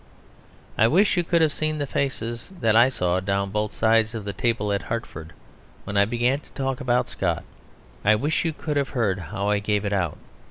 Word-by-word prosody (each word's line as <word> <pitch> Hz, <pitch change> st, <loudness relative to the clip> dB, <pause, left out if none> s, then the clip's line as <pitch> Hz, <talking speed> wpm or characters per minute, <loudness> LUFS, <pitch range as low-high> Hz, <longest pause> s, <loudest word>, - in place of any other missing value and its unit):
I 110 Hz, -, +6 dB
wish 190 Hz, -, +3 dB
you 175 Hz, -, +2 dB
could 170 Hz, -1 st, +2 dB
have 155 Hz, -2 st, +2 dB
seen 155 Hz, 0 st, -1 dB
the 145 Hz, -, -1 dB
faces 120 Hz, -2 st, -3 dB
that 110 Hz, -2 st, +2 dB
I 120 Hz, +3 st, +6 dB
saw 90 Hz, -7 st, 0 dB
down 100 Hz, +1 st, -1 dB
both 105 Hz, 0 st, -1 dB
sides 110 Hz, +1 st, +2 dB
of 110 Hz, -3 st, -5 dB
the 100 Hz, -, -3 dB
table 105 Hz, +1 st, 0 dB
at 100 Hz, -, 0 dB
Hartford 85 Hz, -5 st, -5 dB, 0.5 s
when 100 Hz, -, -6 dB
I 100 Hz, 0 st, +5 dB
began 120 Hz, +5 st, +1 dB
to -, -, -21 dB
talk 135 Hz, -1 st, -2 dB
about 125 Hz, -2 st, +1 dB
Scott. -, -, -2 dB, 0.6 s
I 110 Hz, +2 st, +5 dB
wish 145 Hz, +8 st, 0 dB
you 165 Hz, -, 0 dB
could 150 Hz, -1 st, -3 dB
have 140 Hz, -1 st, 0 dB
heard 100 Hz, -5 st, +1 dB
how 95 Hz, +4 st, -3 dB
I 105 Hz, -, +2 dB
gave 105 Hz, 0 st, -1 dB
it 100 Hz, -, -1 dB
out. 95 Hz, -3 st, -1 dB
115 Hz, 210 wpm, -24 LUFS, 100-135 Hz, 0.6 s, I